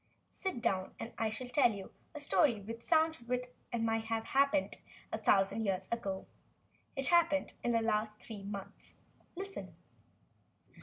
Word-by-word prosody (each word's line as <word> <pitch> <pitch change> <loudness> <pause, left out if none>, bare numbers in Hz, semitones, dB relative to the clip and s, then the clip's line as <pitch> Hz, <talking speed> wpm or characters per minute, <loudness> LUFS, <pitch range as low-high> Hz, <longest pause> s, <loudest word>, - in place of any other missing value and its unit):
Sit 370 -12 -4
down 190 -5 0
and 230 - -6
I 225 - +2
will 255 -1 -6
tell 250 -2 +5
you 195 -1 -8 0.2
a - - -4
story 285 -5 +3
which 225 +3 -7
sounds 320 0 +3
as 235 - -16
though 250 - +2 0.4
it 235 -2 -1
might 225 0 +1
have 225 0 -1
happened 280 +2 +2 0.3
a - - -2
thousand 195 +3 +3
years 190 -2 0
ago. 195 -5 -2 0.7
It 270 -2 +1
happened 335 -4 +4
within 240 - 0
the 230 -1 +2
last 215 0 0
three 215 -3 -8
months. 200 -1 -8 0.4
Listen." 390 +2 -6
230 Hz, 160 wpm, -34 LUFS, 210-280 Hz, 0.7 s, tell